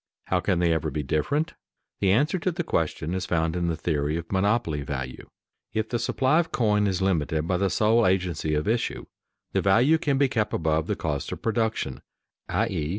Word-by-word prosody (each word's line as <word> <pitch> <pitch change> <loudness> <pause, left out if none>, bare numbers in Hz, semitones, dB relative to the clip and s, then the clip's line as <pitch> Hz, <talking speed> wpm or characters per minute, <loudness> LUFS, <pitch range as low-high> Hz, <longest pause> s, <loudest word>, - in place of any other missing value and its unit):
How 90 - +1
can 90 0 0
they 85 -1 +3
ever 80 -1 -1
be 75 +1 -3
different? 140 - 0 0.5
The 95 -2 +3
answer 150 - +2
to 185 - 0
the 170 +1 -3
question 80 - -1
is 95 -1 -2
found 80 -1 0
in 85 -1 0
the 85 - 0
theory 75 -1 -1
of 85 0 -7
monopoly 100 -5 +1
value. 65 -3 -5 0.4
If 110 0 -1
the 120 - -1
supply 135 +7 +2
of 165 -1 -1
coin 105 -3 +2
is 95 -1 0
limited 80 -4 0
by 90 - +1
the 100 +1 +1
sole 110 +2 +3
agency 90 -5 0
of 75 +4 -1
issue, 115 +2 -1 0.5
the - - +1
value 120 +11 +4
can 140 -3 +1
be 140 0 +4
kept 110 -5 -1
above 80 0 0
the - - 0
cost 75 -3 -3
of - - -6
production 110 - -1 0.5
(_i.e. 75 -1 -1
95 Hz, 200 wpm, -26 LUFS, 80-115 Hz, 0.5 s, value